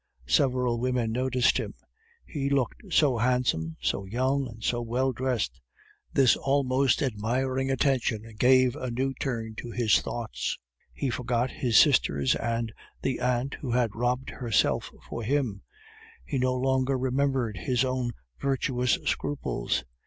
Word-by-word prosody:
Several 125 Hz, -, +2 dB
women 125 Hz, -2 st, 0 dB
noticed 125 Hz, +1 st, +2 dB
him; -, -, -5 dB, 0.5 s
he 140 Hz, -3 st, -2 dB
looked 140 Hz, -, -1 dB
so 140 Hz, -8 st, +3 dB
handsome, 115 Hz, -10 st, +1 dB
so 100 Hz, -, -1 dB
young, 130 Hz, +7 st, 0 dB
and 115 Hz, -1 st, -11 dB
so 120 Hz, +2 st, 0 dB
well 125 Hz, +3 st, 0 dB
dressed. 120 Hz, -, -2 dB, 0.5 s
This 135 Hz, -3 st, +5 dB
almost 135 Hz, -1 st, +2 dB
admiring 130 Hz, +3 st, -1 dB
attention 130 Hz, -5 st, +1 dB, 0.2 s
gave 130 Hz, 0 st, +5 dB
a 130 Hz, -4 st, -4 dB
new 130 Hz, +3 st, -1 dB
turn 115 Hz, -4 st, -3 dB
to 120 Hz, -, -6 dB
his 115 Hz, -2 st, +3 dB
thoughts. -, -, -3 dB, 0.3 s
He 135 Hz, -, -2 dB
forgot 125 Hz, +1 st, -1 dB
his 120 Hz, -5 st, +1 dB
sisters 70 Hz, -2 st, +4 dB
and 115 Hz, -1 st, -2 dB, 0.3 s
the 130 Hz, -, -1 dB
aunt 125 Hz, +2 st, 0 dB
who 135 Hz, -, -4 dB
had 120 Hz, -4 st, +1 dB
robbed 125 Hz, +3 st, -1 dB
herself 115 Hz, -5 st, 0 dB, 0.2 s
for 115 Hz, -, -5 dB
him; 115 Hz, -4 st, -1 dB, 0.6 s
he 140 Hz, -, -2 dB
no 130 Hz, 0 st, +1 dB
longer 130 Hz, +1 st, +1 dB
remembered 130 Hz, -4 st, 0 dB
his 125 Hz, +8 st, +1 dB
own 130 Hz, -2 st, -1 dB, 0.3 s
virtuous 130 Hz, -2 st, +1 dB
scruples. 70 Hz, -, -1 dB
125 Hz, 140 wpm, -27 LUFS, 115-130 Hz, 0.6 s, This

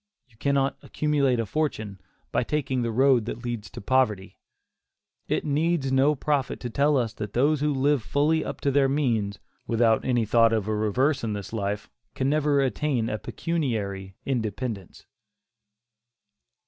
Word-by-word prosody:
You 120 Hz, -, -27 dB
cannot 140 Hz, +1 st, +1 dB
accumulate 140 Hz, -5 st, +1 dB
a 115 Hz, -, 0 dB
fortune 110 Hz, -7 st, -3 dB, 0.3 s
by -, -, +1 dB
taking 135 Hz, -1 st, -1 dB
the 120 Hz, -, -1 dB
road 125 Hz, 0 st, +3 dB
that 120 Hz, +1 st, -6 dB
leads 120 Hz, -3 st, -4 dB
to -, -, -9 dB
poverty. 105 Hz, -5 st, 0 dB, 0.9 s
It -, -, -1 dB
needs 150 Hz, -1 st, +1 dB
no 135 Hz, +3 st, +4 dB
prophet 145 Hz, -1 st, -1 dB
to 120 Hz, -, -4 dB
tell 145 Hz, +3 st, +3 dB
us 115 Hz, -4 st, -1 dB
that 105 Hz, -2 st, -6 dB
those 145 Hz, +4 st, +2 dB
who 150 Hz, 0 st, +2 dB
live 140 Hz, 0 st, +2 dB
fully 145 Hz, -, +1 dB
up -, -, -6 dB
to 140 Hz, -, +1 dB
their 135 Hz, 0 st, +3 dB
means, 115 Hz, -8 st, 0 dB, 0.3 s
without 115 Hz, -1 st, +3 dB
any 120 Hz, -3 st, +1 dB
thought 115 Hz, +1 st, +4 dB
of 110 Hz, -2 st, 0 dB
a 110 Hz, -, 0 dB
reverse 120 Hz, +8 st, +1 dB
in 110 Hz, -2 st, -1 dB
this 100 Hz, +1 st, -6 dB
life, 100 Hz, -1 st, -2 dB, 0.3 s
can 135 Hz, +1 st, 0 dB
never 150 Hz, -2 st, +2 dB
attain 130 Hz, -3 st, 0 dB
a 110 Hz, -, -3 dB
pecuniary 105 Hz, -, -3 dB
independence. 110 Hz, -5 st, -4 dB
125 Hz, 160 wpm, -26 LUFS, 110-140 Hz, 0.9 s, no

